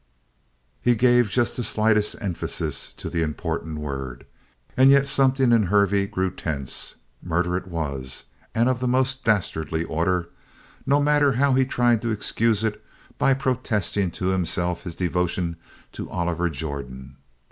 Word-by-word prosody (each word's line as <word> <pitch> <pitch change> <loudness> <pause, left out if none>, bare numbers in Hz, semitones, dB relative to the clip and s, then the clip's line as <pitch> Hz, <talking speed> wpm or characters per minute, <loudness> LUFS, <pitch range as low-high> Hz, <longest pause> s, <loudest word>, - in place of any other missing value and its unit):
He 120 0 +3
gave 120 -1 +4
just 120 +3 0
the - - -2
slightest 110 -1 +2
emphasis 95 -5 -3
to - - -8
the 85 - -2
important 80 0 -3
word, 70 -4 -5 0.5
and 130 +1 +6
yet 140 0 +5
something 135 -2 +3
in 110 -4 +4
Hervey 100 0 +3
grew 95 -1 -1
tense. 70 -5 -3 0.3
Murder 90 +1 0
it 95 - -3
was, 70 -7 -4 0.3
and 115 +2 +3
of 130 -2 +1
the 125 - -1
most 130 +1 +1
dastardly 80 -6 0
order, 85 +2 -1 0.6
no 140 +2 +4
matter 145 -1 +3
how 135 +3 +3
he 130 0 +3
tried 120 -3 +2
to 115 - -2
excuse 110 0 +1
it 110 -1 -2 0.4
by 135 - +4
protesting 110 - 0
to 90 +2 -3
himself 90 -1 -1
his 85 -2 -6
devotion 90 -1 -1 0.3
to - - -7
Oliver 85 0 -1
Jordan. 70 -3 -6
100 Hz, 145 wpm, -24 LUFS, 85-120 Hz, 0.6 s, and